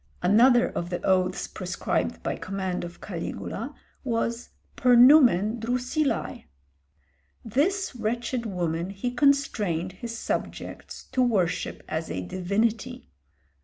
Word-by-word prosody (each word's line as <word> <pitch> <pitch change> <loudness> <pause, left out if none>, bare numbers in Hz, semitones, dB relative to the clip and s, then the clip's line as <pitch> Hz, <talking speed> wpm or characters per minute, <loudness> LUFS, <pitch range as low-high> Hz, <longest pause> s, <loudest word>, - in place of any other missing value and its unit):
Another 240 +6 +5
of 175 - -4
the 175 0 -2
oaths 185 -1 +1
prescribed - - -3
by - - -1
command 190 -1 -3
of 175 0 -9
Caligula - - -5 0.3
was 235 -1 -2 0.3
"per 250 -1 +4
numen 240 - +6
Drusillæ." 250 +6 -1 1.0
This 310 - 0
wretched 235 +1 -2
woman 175 -2 -2
he 200 +5 -3
constrained 240 - +1
his 230 +5 -7
subjects - - -5
to 255 0 +1
worship 200 -9 0
as 160 +1 -3
a - - -3
divinity. 200 - -2
225 Hz, 110 wpm, -26 LUFS, 185-245 Hz, 1.0 s, numen